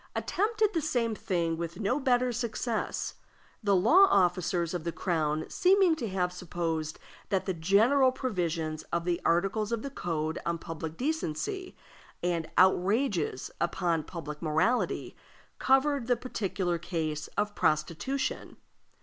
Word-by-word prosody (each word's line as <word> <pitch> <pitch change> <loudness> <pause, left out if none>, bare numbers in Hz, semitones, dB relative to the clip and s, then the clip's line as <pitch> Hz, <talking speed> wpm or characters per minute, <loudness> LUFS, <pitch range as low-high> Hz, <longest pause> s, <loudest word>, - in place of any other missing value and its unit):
attempted 430 +1 +1
the 330 - +1
same 240 -7 0
thing 170 -6 -1
with 170 +2 -5
no 225 +7 +1
better 250 -2 +2
success, 235 -1 -2 0.5
the 200 -3 +3
law 320 - +6
officers 175 -2 +2
of 175 -3 -3
the 170 - -2
crown 155 -3 -1
seeming 370 -2 +4
to 235 -9 -4
have 180 -1 -1
supposed 165 -3 -3 0.3
that 190 -2 0
the 190 - -1
general 220 - +4
provisions 170 - -2
of 170 0 -1
the 175 -1 0
articles 195 +5 +1
of 230 -1 -1
the 280 - -5
code 160 - -2
on 170 0 -1
public 165 -1 -6
decency 315 - -3 0.5
and 170 -2 -1
"outrages 190 - +2
upon 170 -1 +1
public 150 -2 -7
morality" 160 +10 0 0.4
covered 270 -1 +2
the 245 - +3
particular 190 -7 -2
case 155 -3 -3
of 210 0 0
prostitution. 170 - -1
185 Hz, 130 wpm, -29 LUFS, 165-245 Hz, 0.5 s, law